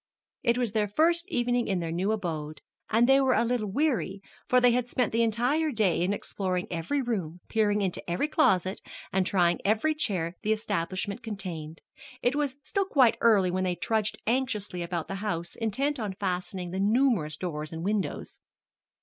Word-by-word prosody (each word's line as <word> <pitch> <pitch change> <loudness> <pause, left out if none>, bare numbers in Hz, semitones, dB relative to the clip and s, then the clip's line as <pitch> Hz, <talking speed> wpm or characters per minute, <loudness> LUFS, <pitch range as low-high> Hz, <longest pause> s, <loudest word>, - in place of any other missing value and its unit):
It 235 -1 +2
was 245 -4 0
their 210 -1 +1
first 335 - +2
evening 245 -7 0
in 190 -2 0
their 165 -1 -3
new 185 +5 0
abode, 160 -7 -3 0.3
and 230 +2 +4
they 270 +1 +6
were 265 -1 +3
a - - +3
little 235 -3 0
weary, 200 - 0 0.3
for 250 - +5
they 245 0 +5
had 245 0 +1
spent 245 -1 0
the 230 - +2
entire 245 +8 +1
day 210 - +1
in 180 +3 +1
exploring 185 -3 -2
every 175 - -1
room, 185 -9 -3
peering 210 -2 +2
into 185 -2 -3
every 175 +12 0
closet, 190 - +2 0.3
and 190 -1 +2
trying 175 -3 +2
every 220 +10 +2
chair 185 - -1
that 180 - -29
the 220 -1 +2
establishment 200 -2 -3
contained. 180 -8 -6 0.4
It 245 +3 +2
was 290 -3 -1
still 395 -1 0
quite 265 -10 +4
early 200 -6 +4
when 185 +1 0
they 180 -1 0
trudged 215 +2 -1
anxiously 215 -7 -1
about 170 -1 -3
the - - -4
house, 170 -5 -3
intent 265 +6 -1
on 210 -4 -3
fastening 180 -1 -3
the 190 - -3
numerous 205 - +2
doors 155 -4 -4
and 165 0 -5
windows. 205 -1 -2
210 Hz, 185 wpm, -28 LUFS, 180-245 Hz, 0.4 s, they